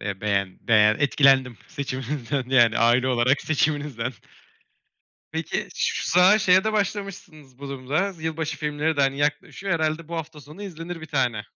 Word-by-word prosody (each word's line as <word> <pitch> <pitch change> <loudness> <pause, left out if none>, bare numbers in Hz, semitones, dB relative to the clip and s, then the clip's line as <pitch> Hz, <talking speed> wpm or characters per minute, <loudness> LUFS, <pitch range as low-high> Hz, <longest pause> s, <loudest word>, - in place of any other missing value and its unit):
eee, 100 -1 -5
beğen 100 -3 -1
beğen 110 -1 +4
etkilendim 135 -3 +3
seçiminizden 135 -2 -4
yani 120 -3 +4
aile 120 +2 +3
olarak 125 +2 +2
seçiminizden. 145 -5 -1 1.2
Peki 160 0 -3
şu - - -1
sıralar 180 +5 +6
şeye 185 -1 +4
de 220 - 0
başlamışsınız 180 -9 -4
bu 140 0 -8
durumda 140 +9 -2
z 165 -4 -16
yılbaşı 160 -1 -3
filmleri 150 +1 -1
de - - +1
hani 135 0 +1
yaklaşıyor 150 +6 -2
herhâlde 160 0 -2
bu 170 - -5
hafta 160 -1 -7
sonu 150 +8 -12
izlenir 170 -2 -7
bir 160 - -8
tane. 125 -8 -1
145 Hz, 155 wpm, -24 LUFS, 130-160 Hz, 1.2 s, sıralar